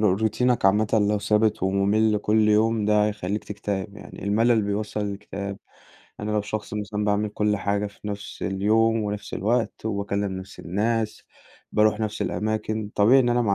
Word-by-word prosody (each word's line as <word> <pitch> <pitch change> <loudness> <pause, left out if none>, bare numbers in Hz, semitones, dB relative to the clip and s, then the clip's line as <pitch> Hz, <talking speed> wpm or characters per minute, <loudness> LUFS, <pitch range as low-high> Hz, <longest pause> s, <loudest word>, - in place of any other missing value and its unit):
روتينك 110 +5 +2
عامةً 105 +2 +3 0.2
لو 105 - +1
ثابت 105 0 +1
ومُمل 100 +3 +2
كل 105 +1 +2
يوم، 110 0 +3
ده 105 0 +3
هيخليك 105 0 -3
تكتئب 100 0 -4
يعني - - -10
الملل 110 +2 +3
بيوصّل 105 +1 -2
للإكتئاب. 100 -1 -5 0.6
أنا 105 +1 -3
لو 105 - +1
شخص 105 0 -5
مثلًا 105 0 -3
باعمل 105 0 +1
كل 105 0 0
حاجة 100 +1 -1
في 100 +1 -9
نفس 100 0 -6
اليوم 110 +3 +2
ونفس 105 0 -4
الوقت 115 +3 -1
وباكلم 100 -1 -1
نفس 95 +1 -10
الناس، 110 +4 -1 0.5
باروح 105 0 +3
نفس 110 -1 -2
الأماكن، 110 0 -2
طبيعي 120 +6 +6
إن 125 - +2
أنا 120 0 +2
مع 100 -4 +2
105 Hz, 160 wpm, -24 LUFS, 100-110 Hz, 0.6 s, طبيعي